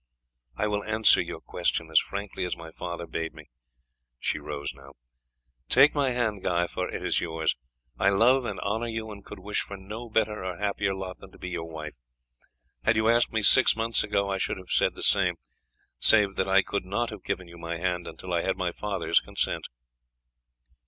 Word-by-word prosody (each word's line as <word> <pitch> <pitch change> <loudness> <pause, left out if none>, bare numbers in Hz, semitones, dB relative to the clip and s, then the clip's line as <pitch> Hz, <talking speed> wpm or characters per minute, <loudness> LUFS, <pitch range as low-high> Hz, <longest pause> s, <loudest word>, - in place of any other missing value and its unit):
I 105 - -1
will 105 -1 -1
answer 110 0 +5
your - - -6
question - - -2
as - - +7
frankly 100 -1 -5
as 90 - -2
my 80 -1 -10
father 85 +1 -6
bade 80 0 -4
me." - - -14 0.7
She 75 - -1
rose 75 -1 -5
now. 70 0 -15 0.8
"Take 135 +4 +6
my 140 -3 +1
hand, 115 -5 -1
Guy, 85 -1 +1
for - - -4
it - - -5
is - - +2
yours. 80 -2 -1 0.4
I 100 - +4
love 120 +7 +4
and 105 -5 -4
honour 110 +4 -1
you, 110 -1 -4
and 100 -1 -10
could 105 - -10
wish 100 +2 -2
for 100 - -7
no 105 +5 -8
better 110 -2 0
or 90 -2 -4
happier 100 0 -1
lot 95 -1 -6
than 95 - -13
to - - -15
be 90 - -6
your 85 -2 -4
wife. 75 -2 -7 0.9
Had 110 - +3
you 110 +1 +2
asked 120 +1 +3
me 110 -1 -1
six 130 +5 +7
months 115 +1 +2
ago 100 -1 0
I 95 - -1
should - - -1
have 95 -1 -11
said - - +3
the - - -5
same, - - +5 0.6
save 105 -3 +6
that 95 - 0
I 95 0 +4
could 100 -2 -3
not 115 +5 -1
have 105 -3 -9
given 95 -2 -3
you 85 0 -13
my 85 0 -4
hand 90 0 -2
until 90 -1 -7
I 85 - +2
had 95 +1 -1
my 90 -2 -1
father's 100 +1 +1
consent." - - -2
100 Hz, 205 wpm, -27 LUFS, 90-110 Hz, 0.9 s, as